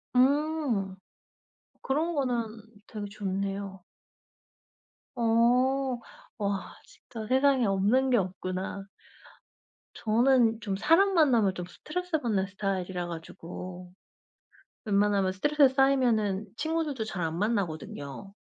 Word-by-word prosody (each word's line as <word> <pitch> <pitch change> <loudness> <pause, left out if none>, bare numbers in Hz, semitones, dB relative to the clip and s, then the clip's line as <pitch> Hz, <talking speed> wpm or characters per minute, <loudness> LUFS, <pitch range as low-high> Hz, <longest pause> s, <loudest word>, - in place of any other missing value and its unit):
음. 270 -7 +2 0.9
그런 320 +5 -1
거는 245 -5 0 0.4
되게 210 -2 -6
좋네요. 195 -1 -4 1.3
어. 250 +3 +2 0.4
와 200 -3 -2
진짜 225 -3 -10
세상에 265 0 +3
없는 205 +7 +2
게 245 - +5
없구나. 185 0 -3 1.1
저는 230 0 +3
좀 200 -4 -2
사람 330 - +4
만나면 240 - +4
좀 180 - -5
스트레스 360 - -3
받는 215 -7 0
스타일이라 190 -3 -3
가지고 180 +2 -8 0.9
웬만하면 200 -2 +2
스트레스 290 +8 +4
쌓이면은 235 -7 +2
친구들도 315 -6 -1
잘 195 -4 -4
안 165 0 -2
만나거든요. 195 - -3
220 Hz, 225 characters per minute, -28 LUFS, 195-265 Hz, 1.3 s, 게